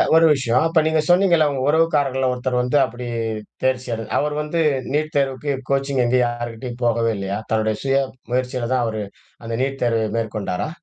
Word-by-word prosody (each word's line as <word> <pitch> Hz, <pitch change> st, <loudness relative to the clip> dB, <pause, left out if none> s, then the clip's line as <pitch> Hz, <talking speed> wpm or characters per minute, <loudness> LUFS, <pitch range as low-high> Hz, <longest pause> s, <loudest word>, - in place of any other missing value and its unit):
ஒரு 165 Hz, -, +6 dB
விஷயம். 130 Hz, -2 st, +1 dB
அப்ப 165 Hz, 0 st, +3 dB
நீங்க 160 Hz, 0 st, +2 dB
சொன்னீங்கல்ல, 175 Hz, -4 st, +4 dB
உங்க 135 Hz, -, -3 dB
உறவுக்காரர்கள்ல 145 Hz, -5 st, +2 dB
ஒருத்தர் 125 Hz, 0 st, -1 dB
வந்து 125 Hz, +4 st, +1 dB
அப்படி 125 Hz, 0 st, -8 dB, 0.6 s
தேர்ச்சியட, 125 Hz, -3 st, -1 dB
அவரு 150 Hz, 0 st, 0 dB
வந்து 150 Hz, +2 st, -2 dB, 0.4 s
நீட் 155 Hz, +1 st, -1 dB
தேர்வுக்கு 140 Hz, +1 st, 0 dB, 0.2 s
கோச்சிங் 135 Hz, -1 st, +1 dB
எங்கயும் 125 Hz, +1 st, +3 dB
யாருகிட்டயும் 120 Hz, +1 st, -6 dB
போகவே 115 Hz, -1 st, +2 dB
இல்லையா? 100 Hz, +1 st, -3 dB
தன்னுடைய 110 Hz, -1 st, +1 dB
சுய 135 Hz, 0 st, +2 dB, 0.3 s
முயற்சியில 125 Hz, -1 st, -1 dB
தான் 125 Hz, -, +2 dB
அவரு 110 Hz, -2 st, -3 dB, 0.4 s
அந்த 115 Hz, -, -3 dB
நீட் 135 Hz, 0 st, -3 dB
தேர்வை 115 Hz, -2 st, +1 dB
மேற்கொண்டாரா? 105 Hz, 0 st, -2 dB
130 Hz, 160 wpm, -21 LUFS, 115-140 Hz, 0.6 s, ஒரு